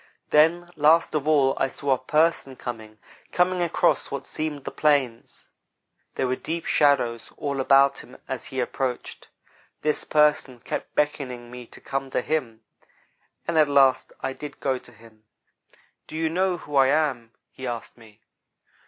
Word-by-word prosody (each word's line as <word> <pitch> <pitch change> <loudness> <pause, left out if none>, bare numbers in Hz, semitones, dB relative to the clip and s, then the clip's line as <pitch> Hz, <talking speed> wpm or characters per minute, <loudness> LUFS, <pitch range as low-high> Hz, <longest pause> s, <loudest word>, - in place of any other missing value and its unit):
Then, 165 +3 +4
last 155 +2 +4
of 150 -1 -1
all, 140 -4 +4
I 135 - +2
saw 140 +1 -3
a 130 - -1
'person' 150 -1 +1
coming 110 -4 -7 0.3
coming 180 0 +2
across 170 -2 +1
what 140 - -5
seemed 155 -3 -4
the - - -5
plains. 140 -6 0 0.7
There - - 0
were 130 0 0
deep 165 +5 -5
shadows 130 -6 +2
all 140 -1 -3
about 135 +1 +4
him 125 - -13
as 130 -1 -5
he 130 - -5
approached. 125 0 -3 0.6
This 150 -1 +1
'person' 150 -5 +2
kept - - -5
beckoning 125 -5 -2
me 125 -1 -9
to - - -13
come 135 0 -4
to 130 - 0
him, 125 -7 -2 0.9
and 165 -2 +2
at 150 -2 +4
last 135 -2 +4
I 130 - -2
did 145 +1 -9
go 130 -2 -1
to 125 - -16
him. 110 -1 -19 0.8
"'Do - - -9
you 160 0 0
know 185 +1 +1
who 145 -3 -4
I 135 -1 +6
am,' 135 -6 0 0.2
he 130 - -7
asked 120 -2 -6
me. 110 -2 -18
135 Hz, 160 wpm, -25 LUFS, 125-150 Hz, 0.9 s, I